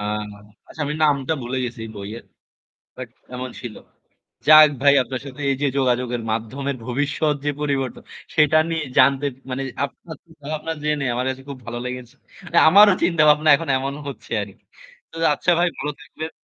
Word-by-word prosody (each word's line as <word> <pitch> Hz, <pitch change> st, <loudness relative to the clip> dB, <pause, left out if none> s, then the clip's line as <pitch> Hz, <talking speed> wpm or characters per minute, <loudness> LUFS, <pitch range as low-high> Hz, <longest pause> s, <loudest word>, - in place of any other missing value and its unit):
আ -, -, -5 dB, 0.7 s
আচ্ছা -, -, -11 dB
আমি 150 Hz, -, -2 dB
নামটা 145 Hz, -1 st, +2 dB
ভুলে 125 Hz, +2 st, -4 dB
গেছি 120 Hz, -1 st, -6 dB, 0.2 s
বইয়ের। 105 Hz, +3 st, -8 dB, 0.7 s
বাট -, -, -7 dB, 0.2 s
এমন 130 Hz, +1 st, -5 dB
ছিল। 120 Hz, -4 st, -7 dB, 0.7 s
যাক 155 Hz, 0 st, +10 dB
ভাই 140 Hz, 0 st, +6 dB
আপনার 130 Hz, 0 st, -6 dB
সাথে 140 Hz, +1 st, -9 dB
এই 135 Hz, -, +1 dB
যে 145 Hz, -, +2 dB
যোগাযোগের 125 Hz, -2 st, 0 dB
মাধ্যমের 130 Hz, +5 st, -3 dB
ভবিষ্যৎ 145 Hz, +4 st, 0 dB
যে -, -, +2 dB
পরিবর্ত 135 Hz, -4 st, -1 dB, 0.4 s
সেটা 155 Hz, 0 st, +4 dB
নিয়ে 165 Hz, -1 st, -1 dB
জানতে 140 Hz, +1 st, +4 dB, 0.3 s
মানে 135 Hz, +2 st, -3 dB, 0.2 s
আপনার 160 Hz, +3 st, -11 dB
চিন্তা 160 Hz, -4 st, -19 dB
ভাবনা 155 Hz, +1 st, -3 dB
জেনে 150 Hz, -2 st, 0 dB
আমার 125 Hz, +1 st, -2 dB
কাছে 130 Hz, 0 st, -5 dB
খুব 140 Hz, -, -6 dB
ভালো 120 Hz, 0 st, -5 dB
লেগেছে। 125 Hz, 0 st, -7 dB, 0.5 s
আমারও 205 Hz, +3 st, +7 dB
চিন্তাভাবনা 155 Hz, -2 st, +4 dB
এখন 165 Hz, +2 st, -6 dB
এমন 135 Hz, +1 st, -3 dB
হচ্ছে 140 Hz, -, -9 dB
আরকি। 100 Hz, -1 st, -10 dB, 0.5 s
তো -, -, -15 dB, 0.2 s
আচ্ছা 175 Hz, -, +1 dB
ভাই 175 Hz, -, +3 dB
ভালো 150 Hz, -, -3 dB
থাকবেন। 155 Hz, +5 st, -7 dB
140 Hz, 165 wpm, -21 LUFS, 125-155 Hz, 0.7 s, যাক